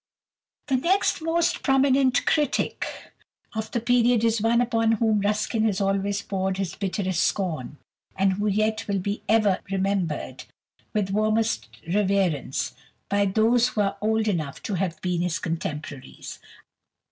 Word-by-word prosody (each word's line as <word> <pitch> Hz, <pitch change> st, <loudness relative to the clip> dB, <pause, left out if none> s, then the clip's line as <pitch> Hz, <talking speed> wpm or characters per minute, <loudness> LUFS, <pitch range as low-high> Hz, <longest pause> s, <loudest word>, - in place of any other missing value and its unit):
The 270 Hz, -3 st, +1 dB
next 355 Hz, +6 st, +1 dB
most 335 Hz, +2 st, +1 dB
prominent 270 Hz, -1 st, +3 dB
critic 300 Hz, -2 st, 0 dB, 0.7 s
of 220 Hz, -1 st, -3 dB
the 235 Hz, -, -1 dB
period 240 Hz, 0 st, +3 dB
is 225 Hz, -1 st, +2 dB
one 230 Hz, +2 st, +3 dB
upon 225 Hz, -2 st, +2 dB
whom 220 Hz, -1 st, +2 dB
Ruskin 215 Hz, +2 st, 0 dB
has 205 Hz, -4 st, +1 dB
always 200 Hz, +1 st, 0 dB
poured 190 Hz, -1 st, -2 dB
his 190 Hz, -3 st, -2 dB
bitterest 190 Hz, -2 st, -1 dB
scorn, 155 Hz, -8 st, -1 dB, 0.4 s
and 195 Hz, 0 st, +2 dB
who 205 Hz, +2 st, -1 dB
yet 215 Hz, +2 st, 0 dB
will 200 Hz, -1 st, 0 dB
be 200 Hz, +2 st, -3 dB
ever 215 Hz, -4 st, +3 dB
remembered 195 Hz, -4 st, -2 dB, 0.5 s
with 205 Hz, -3 st, -1 dB
warmest 215 Hz, +2 st, +1 dB, 0.2 s
reverence 190 Hz, -8 st, 0 dB, 0.4 s
by 200 Hz, 0 st, +2 dB
those 225 Hz, +5 st, +3 dB
who 220 Hz, -4 st, -1 dB
are 200 Hz, 0 st, 0 dB
old 220 Hz, +1 st, +1 dB
enough 155 Hz, -9 st, -2 dB
to 210 Hz, -, -3 dB
have 185 Hz, -2 st, -2 dB
been 180 Hz, -2 st, 0 dB
his 175 Hz, -1 st, 0 dB
contemporaries. 155 Hz, -5 st, -6 dB
205 Hz, 140 wpm, -25 LUFS, 190-225 Hz, 0.7 s, prominent